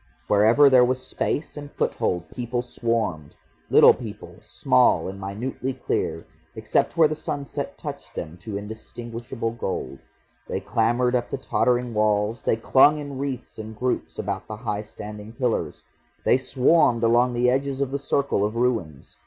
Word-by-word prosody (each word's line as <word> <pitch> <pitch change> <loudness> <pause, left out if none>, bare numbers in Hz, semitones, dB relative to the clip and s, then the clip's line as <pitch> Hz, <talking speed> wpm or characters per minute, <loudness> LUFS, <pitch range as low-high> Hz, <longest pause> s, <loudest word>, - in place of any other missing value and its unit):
Wherever 110 +9 +5
there 130 -2 +6
was 130 +1 0
space 145 +3 -2
and 145 -1 -8
foothold, 90 -2 -1
people 120 0 -3
swarmed, 115 -11 -2 0.3
little - - +8
people, - - -9
small 65 - +2
and 95 +1 -7
minutely 120 +7 -4
clear, 130 - -2 0.3
except 110 +9 0
where 160 -2 +7
the 155 - -2
sunset 145 -2 -5
touched - - -8
them 80 +2 -5
to 100 +3 -6
indistinguishable 115 +2 -6
gold. 95 - -4 0.5
They - - -2
clambered 120 +2 +1
up 120 -1 -1
the - - -3
tottering 125 -2 0
walls, 105 +1 +1
they - - +1
clung 135 +6 +5
in 145 -2 -6
wreaths 130 -5 -5
and 110 0 -7
groups 125 +2 -2
about - - -4
the 110 - -6
high 105 -3 -3
standing 105 0 -9
pillars. 120 -1 -2 0.4
They - - +5
swarmed 130 -2 +3
along 120 +2 +3
the 125 +1 +3
edges 135 +1 -1
of 140 -2 -1
the 140 - -2
circle 140 -6 0
of 105 +2 -1
ruins. 115 - -2
120 Hz, 155 wpm, -24 LUFS, 105-130 Hz, 0.5 s, little